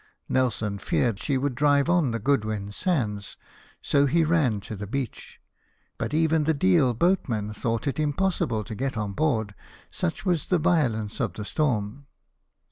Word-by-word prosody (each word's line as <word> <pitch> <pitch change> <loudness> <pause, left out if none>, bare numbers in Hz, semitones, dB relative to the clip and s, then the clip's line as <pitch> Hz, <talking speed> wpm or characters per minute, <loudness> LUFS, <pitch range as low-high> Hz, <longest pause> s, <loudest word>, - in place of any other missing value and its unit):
Nelson 110 -5 0
feared 115 +2 0
she 140 +1 0
would 135 0 -1
drive 140 +2 +3
on 175 -5 +3
the 115 - -1
Goodwin 110 -5 -1
Sands; 105 - -2 0.5
he 145 +4 +3
ran 150 -10 +2
to 110 - -7
the 100 0 -6
beach; 130 +2 -5 0.6
but - - -2
even 160 0 +2
the 160 0 +2
Deal 120 +1 +3
boatmen 115 - 0
thought 115 +1 -2
it 140 +1 -2
impossible 150 - 0
to 110 - -7
get 130 +2 -3
on 105 -2 -2
board, 110 -7 0 0.4
such 85 - -3
was 175 -4 0
the 180 - +3
violence 120 -11 +1
of - - -1
the 105 - -6
storm. 130 -1 -1
130 Hz, 155 wpm, -26 LUFS, 105-150 Hz, 0.6 s, drive